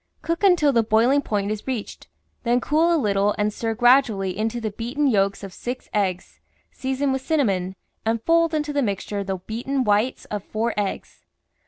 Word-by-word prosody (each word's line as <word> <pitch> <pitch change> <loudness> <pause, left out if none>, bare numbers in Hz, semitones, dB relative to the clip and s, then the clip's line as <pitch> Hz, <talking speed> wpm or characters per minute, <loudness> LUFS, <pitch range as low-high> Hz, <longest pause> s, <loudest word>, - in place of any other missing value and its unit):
Cook 335 0 -2
until 345 -7 +4
the 230 - +4
boil 225 +3 +3
ing 285 +1 +3
point 205 -5 -2
is 215 +2 -5
reached, 250 -5 -5 0.3
then 240 +1 +2
cool 315 +6 +2
a 335 - +3
little 205 -5 +1
and 210 0 0
stir 225 +1 -2
gradually 230 -6 +3
into 220 +3 -2
the 220 -2 -3
beaten 245 +8 -2
yolks 200 -6 +1
of 195 -2 -8
six 245 +5 -6
eggs, 190 -4 -2 0.3
season 265 +1 -1
with 265 - -2
cinnamon, 200 - 0 0.3
and 225 +1 0
fold 330 -1 +3
into 295 -1 -1
the 285 - +1
mixture 200 -2 -2
the 190 -1 -3
beaten 240 +8 -3
whites 210 +3 +1
of 205 -2 -5
four 225 +3 -2
eggs. 205 -2 -4
230 Hz, 185 wpm, -23 LUFS, 205-270 Hz, 0.3 s, until